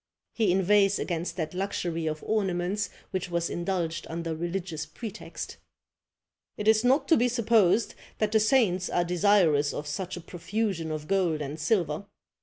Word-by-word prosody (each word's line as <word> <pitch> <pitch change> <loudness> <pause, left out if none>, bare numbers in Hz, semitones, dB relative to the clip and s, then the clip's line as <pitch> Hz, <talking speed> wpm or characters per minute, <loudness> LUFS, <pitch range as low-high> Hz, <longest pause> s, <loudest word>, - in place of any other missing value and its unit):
He 215 -5 +2
inveighs 195 +2 +4
against 170 -1 -3
that 160 -2 -3
luxury 175 -4 -2
of 155 -1 -3
ornaments 195 -1 0 0.2
which 185 -2 -3
was 170 -1 -1
indulged 170 -2 -2
under 165 0 -3
religious 170 -1 -3
pretext: 200 +8 -7 1.0
"It 210 - -3
is 220 +1 +5
not 260 +4 +3
to 325 - +6
be 245 - +3
supposed 230 -4 +3 0.2
that 215 -1 0
the 220 - +4
saints 210 -6 +2
are 175 - +1
desirous 175 -5 +3
of 150 - -4
such 180 +5 -4
a - - -7
profusion 180 0 -3
of 155 -1 -4
gold 180 -5 +1
and 150 +1 -5
silver. 170 +1 0
180 Hz, 155 wpm, -28 LUFS, 165-210 Hz, 1.0 s, to